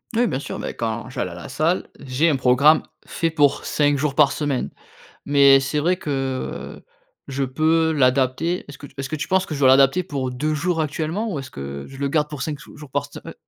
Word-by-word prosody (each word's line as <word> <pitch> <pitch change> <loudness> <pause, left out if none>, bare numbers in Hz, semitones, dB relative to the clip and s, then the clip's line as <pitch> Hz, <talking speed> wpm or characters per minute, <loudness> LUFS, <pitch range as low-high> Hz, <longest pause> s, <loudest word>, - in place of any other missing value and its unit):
Oui, 240 - +3
bien 135 - -1
sûr, - - -6
ben, - - -5
quand 115 0 -3
j'allais 90 - -3
à - - -9
la 85 - -9
salle, 155 +7 0
j'ai 140 +4 +1
un - - +1
programme 135 +4 +4 0.2
fait 165 - -1
pour 145 -3 +2
5 145 -1 +1
jours 145 -2 -1
par 145 -3 +5
semaine. 145 -4 -2 0.5
Mais 140 -1 +6
c'est 140 +2 -2
vrai 175 +5 +2
que 135 -5 -4 0.4
je 140 0 -3
peux 160 +4 +2
l'adapter 135 +4 +1
est-ce 145 - -9
que 145 - -11
tu - - -19
est-ce 135 -1 -3
que 155 - -3
tu 145 - -4
penses 190 0 +2
que 155 - -5
je 145 - -5
dois 130 - +5
l'adapter 135 +6 +5
pour 140 -6 -3
2 150 +5 -2
jours 165 +2 0
actuellement? 160 +8 -2
Ou 155 - -3
est-ce 135 -1 -8
que 70 +1 -7
je 135 - -11
le 140 0 -1
garde 150 +1 +1
pour 150 -4 -6
5 145 0 -4
sou - - -14
jours 150 -2 -12
par 145 +1 -1
se - - -9
heu - - -8
145 Hz, 235 wpm, -22 LUFS, 135-155 Hz, 0.5 s, Mais